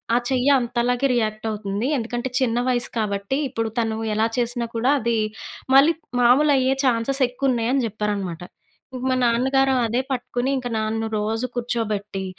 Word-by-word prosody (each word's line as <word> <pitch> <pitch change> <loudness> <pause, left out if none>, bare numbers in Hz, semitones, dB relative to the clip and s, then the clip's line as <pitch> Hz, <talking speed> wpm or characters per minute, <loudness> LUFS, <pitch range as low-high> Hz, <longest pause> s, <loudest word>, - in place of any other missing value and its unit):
ఆ - - +5
చెయ్య 260 +1 +2
అంతలాగే 245 +2 0
రియాక్ట్ 215 -2 -1
అవుతుంది. 205 +2 -3
ఎందుకంటే 240 +1 -3
చిన్న 240 -2 +1
వయసు 240 -1 0
కాబట్టి 200 +3 -1
ఇప్పుడు 225 -3 -2
తను 225 -1 0 0.2
ఎలా 220 +1 +2
చేసినా 240 0 -1
కూడా 235 +4 +1
అది 235 -1 0 0.6
మళ్ళీ 285 +5 +7 0.3
మామూలయ్యే 265 +1 +4
చాన్సే‌స్ 255 +3 +1
ఎక్కువున్నయి 250 -2 0
అని 270 -3 +1
చెప్పారనమాట. 200 -5 -3 0.5
ఇంకా 255 0 -5
మా - - +2
నాన్నగారు 265 +3 +2
అదే 235 +3 0
పట్టుకొని, 250 0 -2
ఇంకా 250 -1 -4
నాన్ను 220 +1 -1
రోజు 220 +3 -1
కూర్చోబెట్టి 215 -5 -2
235 Hz, 145 wpm, -22 LUFS, 220-255 Hz, 0.6 s, మళ్ళీ